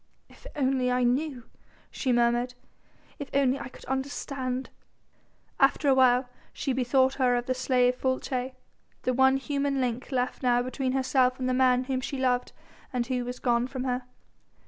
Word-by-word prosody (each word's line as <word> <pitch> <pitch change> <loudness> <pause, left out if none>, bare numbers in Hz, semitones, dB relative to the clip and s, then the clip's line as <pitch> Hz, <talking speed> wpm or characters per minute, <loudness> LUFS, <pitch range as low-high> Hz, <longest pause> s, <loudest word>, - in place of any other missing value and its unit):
"If - - -14
only 260 -2 +1
I 250 0 +1
knew!" 255 +1 0 0.5
she 260 - -1
murmured. 240 +1 +2 0.6
"If 285 - -6
only 270 -1 +2
I 240 - -6
could - - -14
understand!" 265 -1 -3 0.9
After 275 +2 +3
a - - +6
while 255 -1 +4 0.2
she 270 - -2
bethought 260 +1 +2
her 250 -1 +4
of 240 0 -1
the 255 - 0
slave 250 -1 +2
Folces, 260 0 -1 0.5
the 255 - +1
one 265 +1 +4
human 280 0 -1
link 250 +1 -2
left 255 -1 -1
now 245 -2 +2
between 255 +1 -2
herself 260 -1 +2
and 255 - -1
the 255 - +1
man 255 -1 +3
whom 260 0 -2
she 270 +1 -4
loved 250 -1 0 0.4
and 245 -2 -1
who 250 0 -1
was 250 +1 -5
gone 240 -1 +1
from 260 -1 -5
her. 250 -1 -2
255 Hz, 170 wpm, -27 LUFS, 250-265 Hz, 0.9 s, a